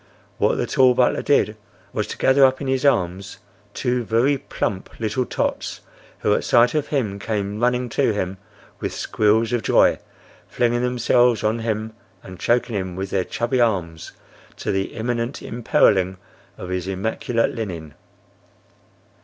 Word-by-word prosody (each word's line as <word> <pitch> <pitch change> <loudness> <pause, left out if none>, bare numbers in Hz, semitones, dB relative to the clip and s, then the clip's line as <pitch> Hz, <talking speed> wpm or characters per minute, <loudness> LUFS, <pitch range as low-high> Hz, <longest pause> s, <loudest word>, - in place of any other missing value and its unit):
What - - +3
the - - -1
tall 130 -1 +4
butler - - +2
did - - +2 0.4
was - - -2
to - - -6
gather 135 +1 +4
up 130 0 +4
in 140 - -5
his 130 0 0
arms 95 -7 0 0.4
two 125 -1 0
very 115 +6 +2
plump 100 -7 -4
little 115 +3 -1
tots - - -2 0.4
who 105 - +2
at - - 0
sight 120 0 +4
of 150 -2 0
him 110 -9 -1
came 105 -1 -3
running 125 +1 +1
to 115 - +1
him 95 -2 -3 0.4
with - - -4
squeals 110 +2 +1
of 120 - +1
joy, - - +3 0.5
flinging 120 0 0
themselves 125 -1 +2
on 110 +2 +1
him, 110 -1 -3 0.3
and 95 -1 -11
choking 120 0 +1
him 95 -2 -3
with 95 +1 -5
their 95 - +1
chubby 120 +6 -1
arms, 90 -8 -1 0.4
to - - -2
the 95 0 -2
imminent 120 +2 -3
imperiling 95 -5 +2 0.4
of 90 - -7
his 90 0 -3
immaculate 110 +4 -1
linen. 85 -9 -6
115 Hz, 155 wpm, -22 LUFS, 95-125 Hz, 0.5 s, tall